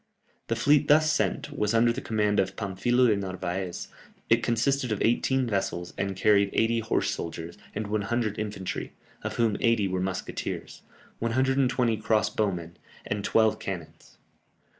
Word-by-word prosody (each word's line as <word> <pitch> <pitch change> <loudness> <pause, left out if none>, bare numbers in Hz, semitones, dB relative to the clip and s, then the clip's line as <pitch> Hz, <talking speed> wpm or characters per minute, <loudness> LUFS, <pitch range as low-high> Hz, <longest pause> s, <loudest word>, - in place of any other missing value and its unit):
The 115 - 0
fleet 145 +5 +3
thus 155 +1 +5
sent - - -1
was 105 +2 0
under 115 +1 +4
the 135 - -5
command 105 -2 +1
of 95 0 0
Pamphilo 115 +5 +1
de 110 -3 +4
Narvaez; 95 -2 -4 0.4
it 115 +1 +5
consisted 125 +2 +1
of 105 - -1
eighteen 130 +3 +2
vessels, 95 -5 -2
and 95 0 -2
carried 100 +1 +4
eighty 115 +1 +2
horse 115 0 0
soldiers, 85 +1 -5 0.2
and 110 - -2
100 110 +1 -1
infantry 105 -3 -4 0.3
(of - - -4
whom 115 -3 +1
eighty 115 -4 +2
were 95 -1 -1
musketeers), 95 0 -4 0.4
120 125 -1 +1
cross 110 0 +1
bowmen, 90 -5 -2 0.3
and 105 0 -3
twelve 110 0 +3
cannons. 90 -5 -7
110 Hz, 145 wpm, -27 LUFS, 95-120 Hz, 0.4 s, thus